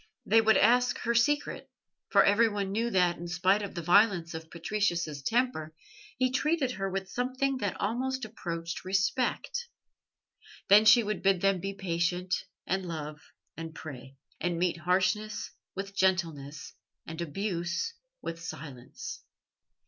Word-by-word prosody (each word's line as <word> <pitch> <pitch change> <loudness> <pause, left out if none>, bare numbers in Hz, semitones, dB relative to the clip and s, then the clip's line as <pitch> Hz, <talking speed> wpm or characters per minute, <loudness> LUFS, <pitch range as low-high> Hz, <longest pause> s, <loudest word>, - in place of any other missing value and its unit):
They 225 - +5
would 220 0 +5
ask 245 +3 +4
her 235 - +1
secret, 290 +5 +1 0.4
for - - +6
everyone 205 -2 +3
knew 230 +4 0
that, 180 -5 +2
in 175 - -6
spite 185 +4 +2
of 200 - -6
the 170 - -4
violence 180 -2 +4
of 160 0 -7
Patricius's 170 -4 -1
temper, 225 - 0 0.4
he 255 0 +2
treated 280 0 +1
her 195 -5 -3
with 190 0 -3
something 260 +2 0
that 205 -6 -3
almost 255 +4 -1
approached 170 -6 -5
respect. 245 - 0 1.0
Then 210 +2 +8
she 220 +2 +8
would 210 -1 -2
bid 195 -2 +3
them 195 -1 +3
be 195 +2 -4
patient, 180 0 -1 0.3
and 190 0 -1
love 150 -2 -5 0.3
and 165 0 -7
pray, 135 -4 -9 0.2
and 175 0 -1
meet 175 0 +1
harshness 190 +5 0 0.2
with 195 +1 -5
gentleness, 165 -7 0 0.3
and 165 +1 -6
abuse 175 - -2 0.3
with 165 0 -5
silence. 135 -6 -8
190 Hz, 140 wpm, -29 LUFS, 170-225 Hz, 1.0 s, Then